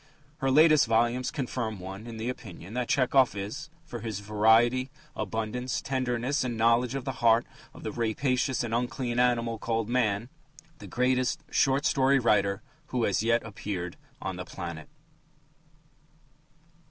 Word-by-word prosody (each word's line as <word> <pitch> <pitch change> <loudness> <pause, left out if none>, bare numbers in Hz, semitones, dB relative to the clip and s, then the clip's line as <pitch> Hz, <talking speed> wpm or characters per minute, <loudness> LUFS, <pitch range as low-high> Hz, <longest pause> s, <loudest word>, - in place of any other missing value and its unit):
Her 135 -3 +1
latest 155 0 +6
volumes 120 +3 +2
confirm 120 -6 -3
one 95 +4 -8
in 115 -1 -7
the 110 +2 -4
opinion 100 -6 -7
that 125 -1 -1
Tchehov 130 -2 +3
is, 105 +10 -5 0.2
for 120 -8 -7
his 110 -3 -4
variety, 110 +5 +3 0.3
abundance, 115 +3 -2
tenderness 130 +1 -1
and 120 -3 -3
knowledge 115 +3 +3
of 135 - -4
the 135 - -1
heart 115 0 +5 0.3
of - - -13
the - - -3
"rapacious 125 +3 0
and 115 -1 -4
unclean 120 0 -1
animal" 120 -2 +1
called 115 -1 -1
man, 115 -2 +1 0.5
the - - -9
greatest 130 +4 0
short 135 +1 +2
story 135 0 +4
writer 105 -4 +2 0.2
who 125 -4 -1
has 100 -2 +1
yet 115 +1 +2
appeared 100 -5 -5 0.2
on 95 -2 -4
the 90 - -4
planet. 85 -4 -7
120 Hz, 145 wpm, -28 LUFS, 110-130 Hz, 0.5 s, latest